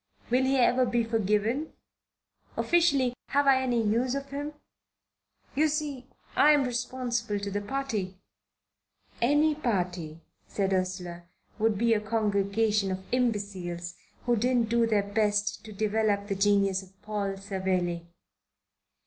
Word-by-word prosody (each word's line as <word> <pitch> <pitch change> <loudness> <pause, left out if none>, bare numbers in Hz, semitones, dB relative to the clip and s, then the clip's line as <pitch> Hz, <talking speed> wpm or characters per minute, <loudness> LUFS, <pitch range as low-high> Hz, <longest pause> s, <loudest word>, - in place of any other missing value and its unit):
Will 255 +2 +3
he 270 +1 +2
ever 255 0 +4
be 240 -1 +1
forgiven? 225 +6 0 0.8
Officially, 285 -8 +3
have 285 +1 +2
I 270 -1 +5
any 245 -2 +1
use 235 +4 +1
for 275 - -1
him? 285 +2 -5 1.0
You 310 +3 +3
see, 290 -4 -3 0.3
I'm 295 -1 +6
responsible 240 -3 -2
to 200 0 -4
the 205 +1 -2
party." 210 -5 -3 1.0
"Any 295 +5 +4
party," 180 - -2 0.3
said 195 -1 -1
Ursula, 180 -2 -3 0.3
"would 220 -1 +2
be 230 +2 +3
a 215 - +2
congregation 210 -1 +1
of 190 0 -4
imbeciles 200 -8 -2 0.3
who 240 -1 +3
didn't 240 0 +1
do 235 0 +3
their 210 -3 +2
best 210 0 0
to 220 - -9
develop 210 0 0
the 200 -1 -2
genius 195 -1 +2
of 190 0 -18
Paul 200 -2 -2
Savelli." 185 -3 -2
215 Hz, 130 wpm, -28 LUFS, 195-250 Hz, 1.0 s, I'm